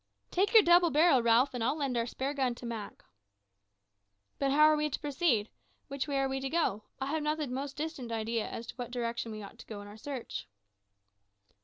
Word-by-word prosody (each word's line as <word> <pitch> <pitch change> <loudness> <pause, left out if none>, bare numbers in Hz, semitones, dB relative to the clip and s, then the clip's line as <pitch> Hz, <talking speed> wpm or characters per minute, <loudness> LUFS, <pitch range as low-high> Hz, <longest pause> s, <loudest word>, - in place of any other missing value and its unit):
"Take 390 +3 +2
your 440 - +10
double 345 0 +6
barrel, 305 -4 +5
Ralph, 235 +4 +4
and 245 -2 -2
I'll 260 +5 +1
lend 275 -4 -1
our 235 0 0
spare 265 +3 -3
big 290 - -9
gun 255 -3 +1
to 245 - -10
Mak." 225 -3 -6 1.4
"But 275 - +1
how 295 +3 +5
are 310 0 +7
we 300 0 0
to - - -3
proceed? 280 -7 +1 0.4
which 275 +1 -3
way 280 -1 -1
are 270 0 +2
we 270 0 -2
to 270 0 -3
go? 265 -11 0
I 265 - -2
have 305 +3 -1
not 300 +1 0
the 305 - -2
most 275 +2 -5
distant 295 -6 -4
idea 225 0 -1
as 230 - -6
to - - -9
what 245 -2 -5
direction 235 -2 -3
we 215 -1 -7
ought 200 - -12
to - - -11
go 215 -2 -7
in 205 - -9
our 205 +1 -11
search." 265 +1 -6
265 Hz, 225 wpm, -31 LUFS, 235-300 Hz, 1.4 s, your